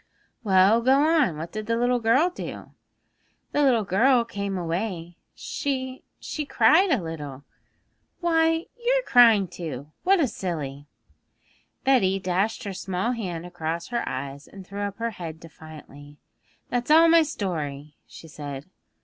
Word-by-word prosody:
'Well, 195 Hz, +2 st, +4 dB
go 260 Hz, +3 st, +4 dB
on. 300 Hz, -, +2 dB
What 165 Hz, +2 st, -6 dB
did 215 Hz, 0 st, -6 dB
the 230 Hz, 0 st, +1 dB
little 245 Hz, +1 st, +1 dB
girl 260 Hz, +10 st, +3 dB
do?' -, -, -8 dB, 0.8 s
'The 295 Hz, -, +1 dB
little 250 Hz, -6 st, +3 dB
girl 235 Hz, +6 st, +3 dB
came 200 Hz, -3 st, -4 dB
away; 175 Hz, 0 st, -4 dB, 0.2 s
she 260 Hz, -2 st, -4 dB, 0.2 s
she 305 Hz, -, -4 dB
cried 335 Hz, +6 st, +4 dB
a 255 Hz, -, +1 dB
little.' 145 Hz, -4 st, -7 dB, 0.8 s
'Why, 325 Hz, -1 st, +2 dB, 0.2 s
you're -, -, +2 dB
crying 225 Hz, -6 st, +6 dB
too! 155 Hz, -5 st, -7 dB
What 385 Hz, +1 st, +3 dB
a 295 Hz, -, +3 dB
silly!' 150 Hz, -, -5 dB, 1.0 s
Betty 200 Hz, -8 st, +3 dB
dashed 195 Hz, +6 st, -1 dB
her 200 Hz, -2 st, -5 dB
small 190 Hz, +5 st, -2 dB
hand 180 Hz, -8 st, -4 dB
across 170 Hz, -1 st, -4 dB
her 240 Hz, -1 st, -1 dB
eyes, 135 Hz, +2 st, -6 dB
and 195 Hz, -1 st, -12 dB
threw 200 Hz, +2 st, -7 dB
up 200 Hz, -1 st, -4 dB
her 230 Hz, 0 st, -2 dB
head 165 Hz, -6 st, -8 dB
defiantly. 150 Hz, -3 st, -13 dB, 0.5 s
'That's 245 Hz, +1 st, -2 dB
all 325 Hz, +2 st, +7 dB
my 330 Hz, 0 st, +6 dB
story,' 155 Hz, -, -4 dB
she 165 Hz, -, -13 dB
said. 145 Hz, -2 st, -7 dB
200 Hz, 145 wpm, -25 LUFS, 165-255 Hz, 1.0 s, all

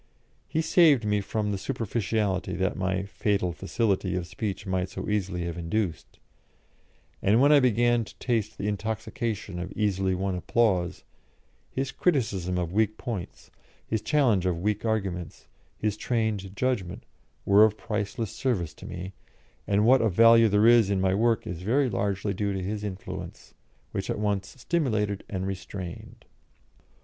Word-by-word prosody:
He 160 Hz, +3 st, 0 dB
saved 155 Hz, -8 st, +5 dB
me 105 Hz, -1 st, +1 dB
from 105 Hz, +1 st, -2 dB
the 100 Hz, -, -2 dB
superficiality 105 Hz, -5 st, -1 dB
that 95 Hz, +1 st, 0 dB
my 95 Hz, 0 st, -1 dB
"fatal 100 Hz, -2 st, -1 dB
facility" 95 Hz, 0 st, -1 dB
of 90 Hz, -1 st, -2 dB
speech 95 Hz, +1 st, -4 dB
might 95 Hz, -1 st, -1 dB
so 95 Hz, -, -6 dB
easily 95 Hz, -4 st, -1 dB
have 85 Hz, 0 st, -4 dB
induced; 85 Hz, 0 st, -3 dB, 1.0 s
and 105 Hz, +4 st, +4 dB
when 140 Hz, +3 st, +5 dB
I 150 Hz, -, +8 dB
began 120 Hz, -1 st, +3 dB
to -, -, -14 dB
taste 110 Hz, -4 st, -1 dB
the 100 Hz, -, -3 dB
intoxication 110 Hz, -2 st, -3 dB
of 90 Hz, +2 st, -5 dB
easily 95 Hz, -3 st, 0 dB
won 95 Hz, +1 st, -1 dB
applause, 90 Hz, -1 st, +1 dB, 0.7 s
his 135 Hz, +1 st, -3 dB
criticism 105 Hz, -, 0 dB
of 90 Hz, -1 st, -2 dB
weak 110 Hz, +1 st, +1 dB
points, 110 Hz, -8 st, -6 dB, 0.3 s
his 110 Hz, -1 st, -1 dB
challenge 120 Hz, -, +2 dB
of 90 Hz, -2 st, 0 dB
weak 105 Hz, +4 st, -1 dB
arguments, 95 Hz, -7 st, -2 dB, 0.3 s
his 105 Hz, -1 st, -1 dB
trained 110 Hz, -6 st, -1 dB
judgment, 120 Hz, -7 st, -1 dB, 0.4 s
were 100 Hz, +2 st, +7 dB
of 110 Hz, -1 st, +3 dB
priceless 105 Hz, 0 st, -3 dB
service 110 Hz, -, -1 dB
to -, -, -11 dB
me, 90 Hz, +2 st, -6 dB, 0.5 s
and 105 Hz, +1 st, +3 dB
what 130 Hz, +3 st, +6 dB
of 110 Hz, -4 st, +1 dB
value 115 Hz, +1 st, +7 dB
there 105 Hz, +2 st, +3 dB
is 115 Hz, -3 st, +6 dB
in 100 Hz, -1 st, +1 dB
my 95 Hz, 0 st, +2 dB
work 115 Hz, +2 st, +2 dB
is 85 Hz, -1 st, -5 dB
very 125 Hz, +6 st, +1 dB
largely 100 Hz, 0 st, -1 dB
due 100 Hz, +1 st, -1 dB
to 95 Hz, -1 st, -3 dB
his 105 Hz, +2 st, -3 dB
influence, 100 Hz, -2 st, -7 dB, 0.4 s
which -, -, -4 dB
at -, -, -1 dB
once 100 Hz, -2 st, -2 dB
stimulated 110 Hz, -, 0 dB
and 95 Hz, -1 st, -3 dB
restrained. 95 Hz, -2 st, -7 dB
105 Hz, 155 wpm, -27 LUFS, 95-115 Hz, 1.0 s, I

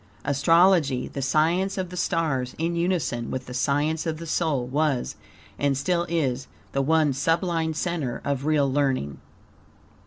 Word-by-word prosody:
ASTROLOGY, 150 Hz, -1 st, +3 dB
the 140 Hz, -, -5 dB
Science 165 Hz, +9 st, +1 dB
of 185 Hz, -2 st, -3 dB
the -, -, -7 dB
Stars, 150 Hz, -8 st, -1 dB
in 165 Hz, +2 st, -1 dB
unison 170 Hz, -9 st, -1 dB
with 130 Hz, -1 st, -4 dB
the 125 Hz, -, -8 dB
Science 150 Hz, +5 st, 0 dB
of 160 Hz, -1 st, -2 dB
the 165 Hz, -, -7 dB
Soul, 155 Hz, -6 st, 0 dB
was, 140 Hz, 0 st, 0 dB, 0.4 s
and 140 Hz, -2 st, +1 dB
still 170 Hz, +5 st, 0 dB
is, 135 Hz, -6 st, -1 dB, 0.2 s
the 140 Hz, -, 0 dB
one 155 Hz, 0 st, +3 dB
sublime 165 Hz, +3 st, 0 dB
center 160 Hz, -7 st, -2 dB
of 140 Hz, -1 st, -1 dB
real 150 Hz, -3 st, +3 dB
learning. 130 Hz, -, 0 dB
155 Hz, 150 wpm, -25 LUFS, 135-165 Hz, 0.4 s, ASTROLOGY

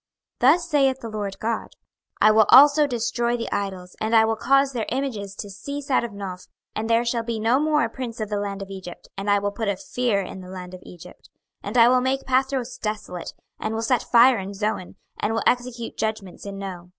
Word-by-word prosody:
26:030:013 255 Hz, -, +6 dB
Thus 350 Hz, -1 st, -6 dB
saith 270 Hz, -4 st, +2 dB
the 230 Hz, -, -6 dB
Lord 205 Hz, -2 st, -4 dB
GOD; 225 Hz, 0 st, -3 dB, 0.5 s
I 215 Hz, -, +6 dB
will 220 Hz, -1 st, +5 dB
also 290 Hz, +2 st, +8 dB
destroy 240 Hz, -1 st, -1 dB
the 230 Hz, -, -5 dB
idols, 190 Hz, -3 st, -4 dB
and 220 Hz, +1 st, +1 dB
I 220 Hz, 0 st, +6 dB
will 225 Hz, 0 st, 0 dB
cause 275 Hz, +4 st, +2 dB
their 230 Hz, -3 st, -2 dB
images 225 Hz, -7 st, -3 dB
to 205 Hz, 0 st, -7 dB
cease 280 Hz, +8 st, -6 dB
out 255 Hz, -, +3 dB
of 235 Hz, -, -3 dB
Noph; 195 Hz, -3 st, -7 dB, 0.3 s
and 220 Hz, +1 st, -3 dB
there 230 Hz, +1 st, +3 dB
shall 235 Hz, 0 st, 0 dB
be 230 Hz, -1 st, -3 dB
no 230 Hz, +5 st, +3 dB
more 300 Hz, -1 st, +2 dB
a 230 Hz, -, -1 dB
prince 245 Hz, -3 st, -6 dB
of 215 Hz, -1 st, -3 dB
the 205 Hz, -1 st, -1 dB
land 200 Hz, -1 st, -4 dB
of 195 Hz, -, -11 dB
Egypt: 185 Hz, -2 st, -9 dB
and 195 Hz, +1 st, -4 dB
I 205 Hz, -, +5 dB
will 205 Hz, 0 st, -1 dB
put 220 Hz, +1 st, -4 dB
a 200 Hz, -2 st, 0 dB
fear 240 Hz, -3 st, -1 dB
in 190 Hz, 0 st, -7 dB
the 180 Hz, -, -11 dB
land 185 Hz, -1 st, -8 dB
of 185 Hz, -, -9 dB
Egypt. 180 Hz, 0 st, -14 dB, 0.3 s
26:030:014 -, -, -7 dB
And 215 Hz, +5 st, -2 dB
I 235 Hz, 0 st, +7 dB
will 255 Hz, 0 st, +4 dB
make 265 Hz, +1 st, 0 dB
Pathros 260 Hz, -1 st, 0 dB
desolate, 210 Hz, -5 st, -5 dB, 0.3 s
and 220 Hz, +1 st, -3 dB
will 225 Hz, -, -2 dB
set 240 Hz, 0 st, +2 dB
fire 245 Hz, -1 st, +5 dB
in 195 Hz, +1 st, -6 dB
Zoan, 205 Hz, -3 st, -3 dB, 0.2 s
and 220 Hz, +2 st, 0 dB
will 225 Hz, -, -1 dB
execute 245 Hz, -2 st, -1 dB
judgments 215 Hz, -4 st, -4 dB
in 200 Hz, 0 st, -6 dB
No. 185 Hz, -3 st, -7 dB
225 Hz, 235 wpm, -24 LUFS, 200-250 Hz, 0.5 s, also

